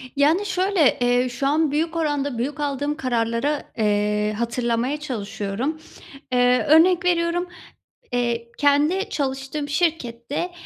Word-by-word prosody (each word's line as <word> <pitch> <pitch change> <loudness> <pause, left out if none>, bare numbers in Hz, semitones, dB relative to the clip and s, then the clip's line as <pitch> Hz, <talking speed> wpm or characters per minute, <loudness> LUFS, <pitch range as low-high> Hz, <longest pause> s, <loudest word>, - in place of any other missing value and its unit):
Yani, 315 +8 +3
şöyle, 370 -5 +2
eee, 245 +1 +2
şu 275 +3 -2
an 305 0 +2
büyük 325 +3 -1
oranda 290 -5 -1
büyük 285 +5 -3
aldığım 290 +1 -2
kararlara, 245 +2 -1
eee, 210 0 +1
hatırlamaya 235 +4 -1
çalışıyorum, 235 +1 -4 0.5
eee, 250 0 +3
örnek 345 +3 +5
veriyorum, 350 0 +1 0.6
eee, 235 -1 -1
kendi 300 +8 +2
çalıştığım 270 +1 -3
şirkette, 295 -1 -2
280 Hz, 115 wpm, -22 LUFS, 240-315 Hz, 0.6 s, örnek